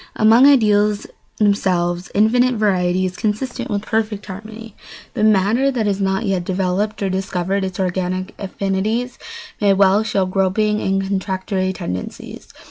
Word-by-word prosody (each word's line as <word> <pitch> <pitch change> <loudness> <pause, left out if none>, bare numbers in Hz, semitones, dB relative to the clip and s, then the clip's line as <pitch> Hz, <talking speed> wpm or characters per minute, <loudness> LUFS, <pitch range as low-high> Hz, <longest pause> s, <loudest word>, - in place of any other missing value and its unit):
Among 225 +5 +6
ideals 210 -6 +3 0.3
themselves 180 -4 0
infinite 245 +4 +3
variety 185 -4 +1
is 180 -1 -4
consistent 240 +5 -3
with 205 -1 -2
perfect 215 -2 -2
harmony, 215 +2 -9 0.4
but 215 - +1
matter 215 +6 +3
that 245 -5 -1
has 200 -1 -1
not 190 +2 0
yet 190 -3 0
developed 190 +3 -1
or 195 - 0
discovered 190 0 -2
its 190 -1 -5
organic 185 0 -2
affinities 200 +5 -2 0.4
may 200 -1 +4
well 195 +1 +4
show 200 -3 0
groping 195 +3 0
and 195 0 0
contradictory 190 -1 -2
tendencies. 90 - -7
200 Hz, 135 wpm, -19 LUFS, 190-215 Hz, 0.4 s, Among